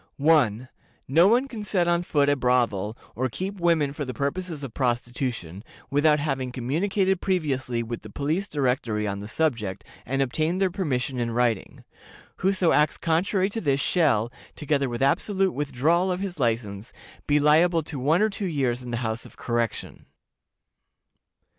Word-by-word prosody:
"1. 135 -6 +3 0.4
No 165 +7 +5
one 245 +6 +3
can 225 -5 -7
set 185 -4 +1
on 170 0 +2
foot 145 -5 +1
a 145 - +4
brothel, 120 -5 +1 0.2
or 130 +2 -1
keep 190 - -5
women 165 -5 +2
for 145 - -4
the 130 -2 -5
purposes 155 +2 -3
of 130 -5 -6
prostitution, 120 - -2 0.3
without 150 +2 +4
having 135 -4 -2
communicated 185 - 0
previously 135 -10 -1
with 115 0 -5
the 110 - -11
Police 155 - -2
Directory 125 - -1
on 100 0 -3
the 105 - -7
subject, 115 - -1 0.2
and 135 +4 -2
obtained 155 +7 0
their 190 -2 +2
permission 135 -9 -2
in 120 -1 -1
writing. 115 -3 -1 0.5
Whoso 190 -2 +2
acts 150 0 +3
contrary 185 +4 +1
to 225 - -4
this 140 -4 +1
shall, 130 - +2 0.2
together 140 -3 0
with 120 +2 -2
absolute 190 +7 +2
withdrawal 150 +6 +1
of 180 - -2
his 190 -4 -5
license, 110 -4 -1 0.4
be 150 0 +4
liable 160 +3 +4
to 145 -2 -6
one 155 +9 +3
or 215 - +2
two 200 -1 -3
years 130 -7 -1
in 125 - -8
the 120 - -2
House 110 +2 -2
of - - -15
Correction. 115 -2 -3
140 Hz, 165 wpm, -25 LUFS, 120-175 Hz, 0.5 s, No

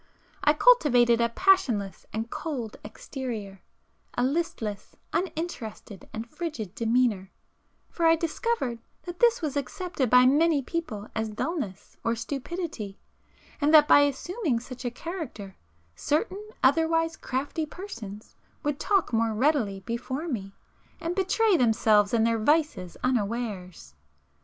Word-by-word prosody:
I 300 - +5
cultivated 250 - +5
a 235 - +3
passionless 235 - +2
and 225 +1 -4
cold 265 -9 -4
exterior,—a 215 -2 -7
listless, 250 - -2 0.2
uninterested 310 - -4
and 225 +1 -5
frigid 235 - -5
demeanor,—for 230 - -2
I 325 - +6
discovered 330 - -1 0.2
that 350 -1 -8
this 470 -7 +4
was 295 -3 -2
accepted 285 - -2
by 250 +1 +7
many 295 +2 +4
people 245 -10 -4
as 220 0 -2
dullness 215 - -4
or 230 0 +1
stupidity, 270 - -5 0.6
and 290 +1 +3
that 300 -1 +8
by - - +8
assuming 285 - 0
such 250 +1 -9
a - - +1
character, 245 - -7 0.4
certain 390 - -1
otherwise 325 +3 +3
crafty 285 +4 -3
persons 230 - -9 0.3
would 295 -1 -1
talk 390 - +1
more 225 -1 +1
readily 230 -6 +1
before 260 - -4
me, 195 - -4 0.4
and 335 +1 -2
betray 395 +2 +2
themselves 215 -4 +4
and 230 -1 +3
their 230 -1 +1
vices 290 - +1
unawares. 210 - -2
255 Hz, 120 wpm, -27 LUFS, 220-325 Hz, 0.6 s, that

